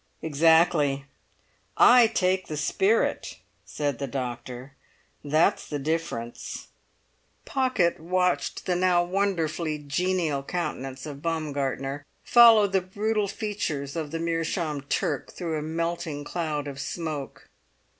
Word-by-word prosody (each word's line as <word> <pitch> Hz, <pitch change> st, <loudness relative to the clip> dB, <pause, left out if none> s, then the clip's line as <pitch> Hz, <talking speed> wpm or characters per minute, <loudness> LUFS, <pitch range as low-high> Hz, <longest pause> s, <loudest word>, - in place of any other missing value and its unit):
"Exactly! 155 Hz, -2 st, +3 dB, 0.7 s
I 245 Hz, -1 st, +7 dB
take 185 Hz, -4 st, 0 dB
the 155 Hz, -, -4 dB
spirit," 195 Hz, +8 st, +1 dB, 0.3 s
said 145 Hz, -4 st, -3 dB
the 140 Hz, -, -3 dB
doctor; 125 Hz, 0 st, -6 dB, 0.5 s
"that's 155 Hz, +3 st, +2 dB
the 150 Hz, -, -2 dB
difference." 145 Hz, -6 st, -4 dB, 0.8 s
Pocket 255 Hz, -10 st, +1 dB
watched 180 Hz, +2 st, 0 dB
the 180 Hz, -, +1 dB
now 180 Hz, -1 st, +3 dB
wonderfully 175 Hz, -4 st, -1 dB
genial 155 Hz, 0 st, -1 dB
countenance 135 Hz, -4 st, -4 dB
of 145 Hz, -2 st, -8 dB
Baumgartner 145 Hz, -3 st, -2 dB, 0.2 s
follow 230 Hz, -3 st, +7 dB
the 195 Hz, -1 st, +1 dB
brutal 210 Hz, +3 st, -1 dB
features 195 Hz, -10 st, -3 dB
of 160 Hz, -3 st, -3 dB
the 165 Hz, -, -3 dB
meerschaum 165 Hz, -2 st, -2 dB
Turk -, -, -1 dB
through 165 Hz, -4 st, -3 dB
a -, -, -5 dB
melting 165 Hz, -1 st, -3 dB
cloud 150 Hz, -3 st, -3 dB
of 140 Hz, -1 st, -7 dB
smoke. 155 Hz, -5 st, -5 dB
160 Hz, 115 wpm, -26 LUFS, 145-185 Hz, 0.8 s, I